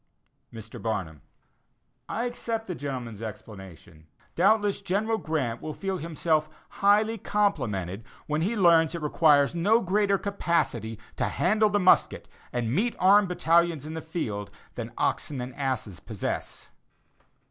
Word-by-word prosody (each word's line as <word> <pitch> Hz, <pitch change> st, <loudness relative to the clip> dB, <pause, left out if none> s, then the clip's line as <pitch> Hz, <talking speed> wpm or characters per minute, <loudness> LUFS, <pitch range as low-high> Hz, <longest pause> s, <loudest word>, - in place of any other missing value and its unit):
Mr. 110 Hz, -1 st, -10 dB
Barnum: 90 Hz, -, -3 dB, 0.9 s
I 230 Hz, -, -2 dB
accept 230 Hz, -2 st, -3 dB
the 185 Hz, -, -4 dB
gentleman's 125 Hz, -, -6 dB
explanation. 95 Hz, -6 st, -10 dB, 0.3 s
Doubtless 205 Hz, +2 st, +2 dB
General 210 Hz, +4 st, 0 dB
Grant 140 Hz, -, -2 dB
will 155 Hz, -, -5 dB
feel 195 Hz, -2 st, -3 dB
himself 155 Hz, -1 st, 0 dB, 0.3 s
highly 210 Hz, +3 st, +3 dB
complimented 115 Hz, -, -1 dB, 0.2 s
when 150 Hz, +1 st, -1 dB
he 205 Hz, +8 st, 0 dB
learns 165 Hz, -5 st, +4 dB
that -, -, -3 dB
it 160 Hz, -, -8 dB
requires 150 Hz, -1 st, +4 dB
no 200 Hz, +7 st, +3 dB
greater 200 Hz, 0 st, +1 dB
capacity 165 Hz, -, -1 dB, 0.2 s
to -, -, +1 dB
handle 215 Hz, +4 st, +2 dB
the 205 Hz, 0 st, +1 dB
musket, 185 Hz, -1 st, +3 dB, 0.2 s
and 120 Hz, -1 st, -1 dB
meet 230 Hz, -, 0 dB
armed 200 Hz, +2 st, +5 dB
battalions 170 Hz, -3 st, +2 dB
in 155 Hz, -, -6 dB
the 160 Hz, -, -5 dB
field, 110 Hz, -, -4 dB, 0.2 s
than -, -, -6 dB
"oxen 145 Hz, -3 st, -1 dB
and 125 Hz, +1 st, -5 dB
asses" 130 Hz, -, -3 dB
possess. -, -, -5 dB
160 Hz, 135 wpm, -27 LUFS, -, 0.9 s, armed